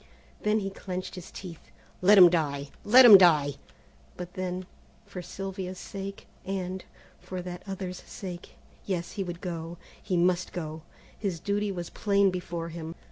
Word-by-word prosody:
Then 210 Hz, +1 st, +2 dB
he 195 Hz, 0 st, -3 dB
clinched 185 Hz, -1 st, -6 dB
his 180 Hz, -, -9 dB
teeth. 175 Hz, -4 st, -10 dB, 0.3 s
"Let 200 Hz, +3 st, +7 dB
him 180 Hz, -2 st, +11 dB
die! 145 Hz, -4 st, -1 dB
Let 250 Hz, +5 st, +8 dB
him 210 Hz, -5 st, +11 dB
die!" 150 Hz, -6 st, +5 dB, 0.6 s
but 180 Hz, 0 st, -7 dB
then, 185 Hz, 0 st, -3 dB, 0.4 s
for 200 Hz, -3 st, -7 dB
Sylvia's 190 Hz, 0 st, -6 dB
sake, 195 Hz, +1 st, -7 dB, 0.2 s
and, 190 Hz, -1 st, -4 dB, 0.4 s
for 185 Hz, -, -6 dB
that 180 Hz, -1 st, -7 dB
other's 190 Hz, -2 st, -5 dB
sake, 180 Hz, -3 st, -9 dB, 0.3 s
Yes, 175 Hz, -3 st, -3 dB
he 200 Hz, -, -3 dB
would 175 Hz, -1 st, -6 dB
go, 170 Hz, -1 st, -5 dB, 0.2 s
he 180 Hz, -, -1 dB
must 180 Hz, +1 st, +1 dB
go, 160 Hz, -2 st, -5 dB, 0.3 s
his 190 Hz, -5 st, -3 dB
duty 205 Hz, +3 st, -1 dB
was 175 Hz, -3 st, -5 dB
plain 200 Hz, -2 st, +2 dB
before 175 Hz, -2 st, -4 dB
him. 165 Hz, 0 st, -7 dB
180 Hz, 155 wpm, -28 LUFS, 175-195 Hz, 0.6 s, him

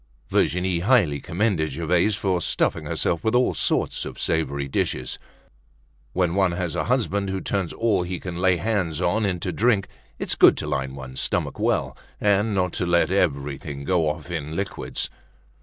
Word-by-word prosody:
Virginie 90 Hz, 0 st, +1 dB
highly 90 Hz, -, +3 dB
commended 85 Hz, -3 st, 0 dB
Gervaise 85 Hz, +6 st, +2 dB
for 95 Hz, -3 st, 0 dB
stuffing -, -, 0 dB
herself 85 Hz, -, 0 dB
with 110 Hz, +2 st, +1 dB
all 125 Hz, +1 st, +3 dB
sorts -, -, 0 dB
of -, -, -7 dB
savory 70 Hz, -3 st, -1 dB
dishes. 65 Hz, -1 st, -2 dB, 0.9 s
When 90 Hz, -2 st, +1 dB
one 95 Hz, -2 st, +2 dB
has 85 Hz, -2 st, -2 dB
a -, -, -1 dB
husband 105 Hz, -5 st, 0 dB
who 95 Hz, 0 st, -2 dB
turns 95 Hz, -3 st, -2 dB
all 110 Hz, -5 st, +1 dB
he 90 Hz, 0 st, -4 dB
can 90 Hz, -2 st, -6 dB
lay 95 Hz, 0 st, +3 dB
hands 90 Hz, -5 st, -1 dB
on 105 Hz, +4 st, +1 dB
into 90 Hz, -1 st, -2 dB
drink, 105 Hz, -2 st, +2 dB, 0.3 s
it's -, -, -1 dB
good -, -, +6 dB
to -, -, -3 dB
line 65 Hz, 0 st, -2 dB
one's 65 Hz, -1 st, -7 dB
stomach -, -, -1 dB
well, -, -, 0 dB, 0.2 s
and 105 Hz, +1 st, +2 dB
not 90 Hz, -2 st, +1 dB
to 90 Hz, -, 0 dB
let 85 Hz, -1 st, +3 dB
everything 70 Hz, -5 st, -1 dB
go 80 Hz, -1 st, +2 dB
off 75 Hz, +3 st, -5 dB
in 80 Hz, -2 st, -4 dB
liquids. 100 Hz, +2 st, -3 dB
90 Hz, 170 wpm, -24 LUFS, 80-100 Hz, 0.9 s, good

